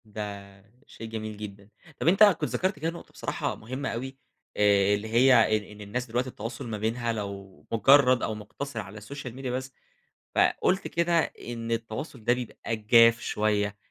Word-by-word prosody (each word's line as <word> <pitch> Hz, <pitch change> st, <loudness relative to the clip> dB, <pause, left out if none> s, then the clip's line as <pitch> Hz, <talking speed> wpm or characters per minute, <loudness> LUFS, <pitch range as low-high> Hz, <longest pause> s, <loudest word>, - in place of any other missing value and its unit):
ده، 100 Hz, -2 st, -8 dB, 0.3 s
شيء 115 Hz, -, -9 dB
جميل 110 Hz, -1 st, -5 dB
جدًا، 100 Hz, -1 st, -9 dB, 0.3 s
طَب -, -, -2 dB
أنت 195 Hz, +5 st, +6 dB
كُنت 205 Hz, -4 st, +4 dB
ذكرت 185 Hz, +2 st, -1 dB
كده 160 Hz, -, -1 dB
نقطة، 170 Hz, -, -10 dB
بصراحة -, -, -3 dB
مهمة 130 Hz, +5 st, -5 dB
أوي. 130 Hz, +3 st, -5 dB, 0.4 s
آآ 100 Hz, -1 st, +4 dB
اللي 105 Hz, +2 st, -5 dB
هي 115 Hz, -1 st, +5 dB
إن 105 Hz, -, -6 dB
إن 105 Hz, 0 st, -13 dB
الناس 105 Hz, +5 st, -3 dB
دلوقتي، 125 Hz, +2 st, -2 dB
التواصل 115 Hz, 0 st, -6 dB
ما 110 Hz, -2 st, -3 dB
بينها 115 Hz, +2 st, -1 dB
لو 100 Hz, -3 st, -7 dB
مجرد 130 Hz, +2 st, +5 dB
أو 110 Hz, -, -1 dB
مقتصر 140 Hz, +7 st, -6 dB
على 100 Hz, +3 st, -8 dB
السوشيال 125 Hz, +3 st, -8 dB
ميديا 130 Hz, -1 st, -4 dB
بس، 130 Hz, +1 st, -4 dB, 0.6 s
فقُلت 190 Hz, +1 st, +2 dB
كده، 170 Hz, 0 st, +2 dB
إن 115 Hz, -4 st, -6 dB
التواصل 115 Hz, +3 st, -4 dB
ده 120 Hz, -, +4 dB
بيبقى 120 Hz, -2 st, -4 dB
جاف 115 Hz, +1 st, +5 dB
شوية، 105 Hz, -1 st, 0 dB
115 Hz, 170 wpm, -27 LUFS, 105-130 Hz, 0.6 s, أنت